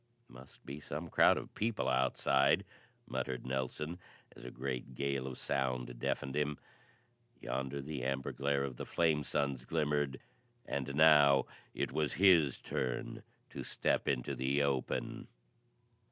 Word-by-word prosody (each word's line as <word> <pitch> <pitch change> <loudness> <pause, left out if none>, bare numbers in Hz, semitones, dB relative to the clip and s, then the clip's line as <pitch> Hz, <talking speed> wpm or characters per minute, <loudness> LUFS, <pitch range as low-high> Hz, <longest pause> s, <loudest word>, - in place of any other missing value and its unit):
"Must 65 +2 -15
be 70 +2 -6
some 75 +3 -6
crowd - - +6
of - - -7
people 110 -5 -1
outside," 65 +1 +3 0.4
muttered 65 -1 -3
Nelson 65 +6 -3 0.4
as - - -13
a 60 - -6
great 65 0 -5
gale 70 0 -1
of 65 - -6
sound 65 -2 -2
deafened 65 +2 -2
him. 75 -1 0 0.8
Yonder 65 +2 -3
the 70 -3 -5
amber 65 0 -1
glare 70 0 0
of 65 -3 -4
the - - -5
flame 80 -3 +2
suns 70 -2 -1
glimmered, 75 -2 0 0.5
and 70 0 -3
now 75 -3 +6 0.3
it - - -1
was 75 0 0
his 85 -8 +5
turn 65 0 -3 0.3
to - - -6
step - - 0
into 60 -3 0
the 70 +2 +1
open! 70 -2 -2
70 Hz, 140 wpm, -34 LUFS, 65-75 Hz, 0.8 s, crowd